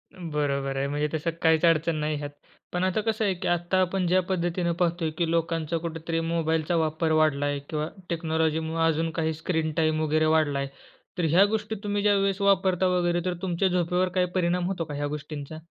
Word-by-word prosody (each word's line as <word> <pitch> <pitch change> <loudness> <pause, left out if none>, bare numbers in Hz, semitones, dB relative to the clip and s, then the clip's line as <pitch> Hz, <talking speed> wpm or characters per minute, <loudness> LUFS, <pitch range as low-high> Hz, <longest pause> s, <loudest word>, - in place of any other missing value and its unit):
बरोबर 145 -5 -2
आहे, 135 +1 0
म्हणजे 145 +1 -1
तसं 160 +1 -1
काहीच 160 0 +3
अडचण 165 0 +3
नाही 155 0 -1
ह्यात. 145 0 -5 0.4
पण 180 0 0
आता 185 +3 +1
कसं 220 0 0
आहे, 195 - +2
की 185 +1 -5
आत्ता 175 +2 +1
आपण 185 0 0
ज्या 185 +2 +4
पद्धतीने 175 -1 0
पाहतोय, 170 -2 +1
की 170 -2 0
लोकांचा 165 -1 0
कुठेतरी 165 0 -3
मोबाईलचा 165 0 0
वापर 160 0 0
वाढलाय 145 -2 +2
किंवा 155 -1 -2 0.2
टेक्नॉलॉजीमूळे 160 -1 0
अजून 165 +1 +1
काही 160 0 0
स्क्रीन 160 0 -1
टाईम 155 -1 +2
वगैरे 155 +1 +2
वाढलाय. 145 -3 +1 0.5
तर 175 - +1
ह्या 180 +6 +6
गोष्टी 220 0 -3
तुम्ही 205 0 -1
ज्यावेळेस 200 -1 +2
वापरता 190 -2 +3
वगैरे, 175 -1 +1
तर 180 - 0
तुमच्या 185 0 +1
झोपेवर 180 0 +1
काय 180 - +4
परिणाम 180 0 +1
होतो 185 -3 -2
का 150 - -7
ह्या 145 0 -2
गोष्टींचा? 150 0 -6
165 Hz, 185 wpm, -26 LUFS, 155-180 Hz, 0.5 s, ह्या